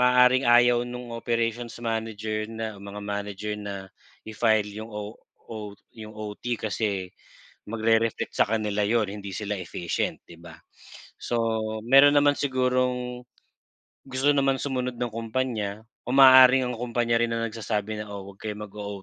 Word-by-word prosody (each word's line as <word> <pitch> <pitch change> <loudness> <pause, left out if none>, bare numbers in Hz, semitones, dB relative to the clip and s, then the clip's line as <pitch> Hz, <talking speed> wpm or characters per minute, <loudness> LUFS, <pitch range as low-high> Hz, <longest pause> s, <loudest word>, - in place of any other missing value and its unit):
maaaring 125 +1 +5
ayaw 120 0 +5
no'ng 120 -1 -7
operations 115 0 -2
manager 110 -1 -3
na 110 -1 -5
mga 100 +1 -8
manager 105 0 -4
na 100 -2 -6 0.4
i-file 110 -1 +1
'yung 110 - -10
o 105 +1 -6 0.4
o 105 -2 -6 0.2
yung 110 -1 -9
OT 105 -1 -8 0.2
kasi 100 -3 -2 0.6
magre-reflect 115 0 0
sa - - +4
kanila 105 -2 0
'yun 110 +1 +2
hindi 100 -1 -7
sila 105 -1 -3
efficient, 85 -1 -3
'di 85 - -13
ba? 85 -1 -12 0.6
So 120 - -3 0.5
meron 140 +3 +7
naman 145 0 +4
sigurong 125 -2 0 0.8
gusto 135 +2 +1
naman 135 -1 +2
sumunod 125 -3 -2
ng 120 -2 -2
kumpanya 110 -3 -3 0.2
o - - -1
maaaring 130 -1 +8
ang 125 - -3
kumpanya 120 -1 0
rin 115 - +1
ang 115 0 -1
nagsasabi 110 -1 -3
na, 105 - -13
oh, 100 -1 -7
huwag 95 - -22
kayo 110 - -3
mag 105 -2 -8
o 100 -1 -6
115 Hz, 150 wpm, -26 LUFS, 105-125 Hz, 0.8 s, maaaring